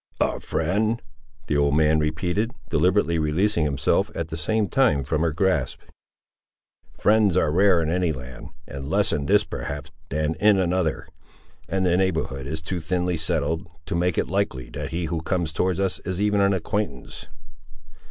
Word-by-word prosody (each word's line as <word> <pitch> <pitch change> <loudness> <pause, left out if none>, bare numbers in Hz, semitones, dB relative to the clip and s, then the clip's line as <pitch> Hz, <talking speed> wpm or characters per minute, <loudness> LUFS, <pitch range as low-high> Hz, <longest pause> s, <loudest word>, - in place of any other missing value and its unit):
"A - - +1
friend!" 110 +4 0 0.5
the 75 - -1
old 70 0 +3
man 80 0 +4
repeated, 90 +9 -1 0.2
deliberately 85 +1 +2
releasing 85 +3 +1
himself, 70 -1 +1
at 80 -1 -3
the 80 - -4
same 105 +6 0
time, 120 - +2
from 75 +4 -1
her 85 -1 +2
grasp. 80 -6 0 1.2
"Friends 105 -4 +3
are 80 -4 +2
rare 90 0 +4
in 80 - -1
any 90 -1 +1
land, 65 -3 -8 0.2
and 70 0 -7
less - - +2
in 70 -1 -2
this, 105 +3 +4
perhaps, 70 -6 -6 0.2
than 75 +2 0
in 105 -1 +5
another; 90 -4 0 0.6
and 95 -1 0
the 90 0 +3
neighbourhood 80 -8 -1
is 80 +2 -4
too 90 +3 -3
thinly 90 +2 -1
settled 80 +2 -1 0.2
to - - -4
make 90 0 0
it - - +1
likely 90 -10 -2
that - - -5
he 85 +1 -2
who 80 0 -2
comes 85 -2 -1
towards 90 +2 0
us 95 -2 0
is 95 -1 -4
even 105 0 +2
an 100 0 +4
acquaintance." 95 - -3
85 Hz, 170 wpm, -24 LUFS, 75-95 Hz, 1.2 s, in